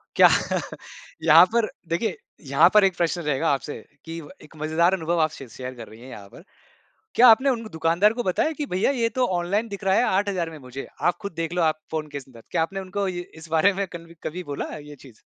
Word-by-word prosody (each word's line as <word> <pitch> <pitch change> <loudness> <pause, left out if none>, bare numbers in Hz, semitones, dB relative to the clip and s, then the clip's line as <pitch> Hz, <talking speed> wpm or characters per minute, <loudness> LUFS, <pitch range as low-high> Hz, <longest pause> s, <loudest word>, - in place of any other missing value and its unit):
क्या - - +8 1.0
यहाँ - - +8
पर 235 -1 +3 0.2
देखिए 175 +4 -1 0.3
यहाँ 140 +5 +6
पर 210 -1 +7
एक 190 -2 +3
प्रश्न 175 0 0
रहेगा 150 +1 0
आपसे 140 +1 -4 0.3
कि 165 0 -6 0.2
एक 155 - -16
मजेदार 160 +4 +2
अनुभव 170 -2 0
आप 155 - +3
शे 135 - -10
शेयर 130 +3 -7
कर 115 -2 -9
रही 110 +1 -14
हैं 130 - -11
यहाँ 100 -5 -10
पर 170 - -14 0.7
क्या 250 +1 +7
आपने 260 +5 +6
उन 235 -3 -1
दुकानदार 170 +6 +2
को 240 - -3
बताया 190 - +1
कि 295 - -2
भैया 185 +8 +2
ये 235 -4 0
तो 255 - +3
ऑनलाइन 200 +6 -1
दिख 200 0 -7
रहा 190 0 +2
है 235 - +4
8000 190 -4 0
में 160 - -10
मुझे 130 0 -8
आप 175 - +2
खुद 200 -1 -5
देख 165 +1 -3
लो, 180 - 0
आप 155 -1 +1
फ़ोन 155 -1 -3
के 145 -1 -7
अंदर, 130 -4 -12
क्या - - +1
आपने 195 +4 -2
उनको 195 +1 -3
ये 180 -1 -3 0.2
इस 160 0 -11
बारे 165 +5 +4
में 195 +1 -2
कन्वी 170 -1 -11
कभी 180 +4 -4
बोला 145 -3 -4
ये 150 0 -11
चीज़? 130 -5 -16
170 Hz, 230 wpm, -24 LUFS, 155-195 Hz, 1.0 s, क्या